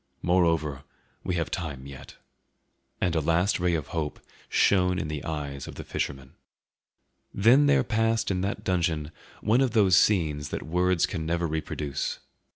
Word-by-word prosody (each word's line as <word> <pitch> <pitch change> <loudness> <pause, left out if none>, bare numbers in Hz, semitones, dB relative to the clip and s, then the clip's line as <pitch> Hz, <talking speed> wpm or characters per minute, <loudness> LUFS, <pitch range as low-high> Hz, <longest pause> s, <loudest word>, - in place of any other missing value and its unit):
Moreover, 80 -6 +1 0.4
we 90 - -2
have 85 -5 -2
time 70 -6 -4
yet." 70 0 -11 0.8
And 90 -2 0
a - - +3
last 85 +7 +1
ray 90 -1 +1
of 75 -3 -4
hope 80 -3 -3 0.3
shone 90 -2 +3
in 75 - -3
the 75 -2 -4
eyes 70 -3 -5
of - - -8
the - - -7
fisherman. 65 -1 -4 1.0
Then 125 +8 +5
there 140 -2 +4
passed 115 -2 0
in 90 -1 -1
that 100 +2 -3
dungeon 85 -4 0 0.3
one 115 +5 +3
of 130 -4 +1
those 100 -6 +5
scenes 75 -8 +2
that - - -4
words 90 +1 +2
can 80 -5 -4
never 85 +1 0
reproduce. 75 -3 -3
85 Hz, 160 wpm, -27 LUFS, 75-95 Hz, 1.0 s, Then